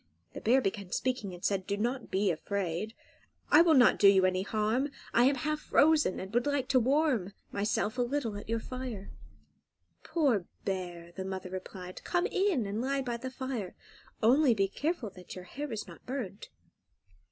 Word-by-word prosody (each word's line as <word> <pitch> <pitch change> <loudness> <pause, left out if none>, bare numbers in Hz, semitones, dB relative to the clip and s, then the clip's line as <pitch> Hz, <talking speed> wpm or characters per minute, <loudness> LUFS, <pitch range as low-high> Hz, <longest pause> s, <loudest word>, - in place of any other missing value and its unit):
The - - -7
bear 255 +4 +4
began 195 -4 -3
speaking, 250 -6 -1
and 175 0 -8
said, 195 -2 0
"Do 200 - -1
not 240 +4 -2
be 195 0 +2
afraid: 195 +4 -3 0.6
I 305 - +9
will 335 -2 +5
not 245 -3 +6
do 200 - +7
you 190 -1 +6
any 185 0 +1
harm; 220 +7 0 0.2
I 240 - +5
am 275 +2 +4
half 305 +3 -1
frozen, 305 -7 +3
and 190 +3 -7
would 240 +3 +2
like 285 -2 0
to 260 - +5
warm 255 - +1 0.2
myself 210 +3 -1
a - - +4
little 245 -3 -1
at 205 - -8
your 230 0 0
fire." 250 -5 -6 0.9
"Poor 265 - +1 0.2
bear!" 175 -3 -4
the 190 - -4
mother 190 -1 -5
replied; 185 -1 -7
"come 350 0 +1
in 375 - +1
and 205 +3 -2
lie 275 +1 0
by 240 -2 -2
the 260 +2 -5
fire; 255 -7 -5 0.5
only 255 +2 +5
be 195 -2 +2
careful 275 - -2
that 180 -1 -11
your 180 -1 -8
hair 285 +9 -6
is 220 -2 -4
not - - -13
burnt." 235 -7 -5
225 Hz, 185 wpm, -31 LUFS, 195-265 Hz, 0.9 s, I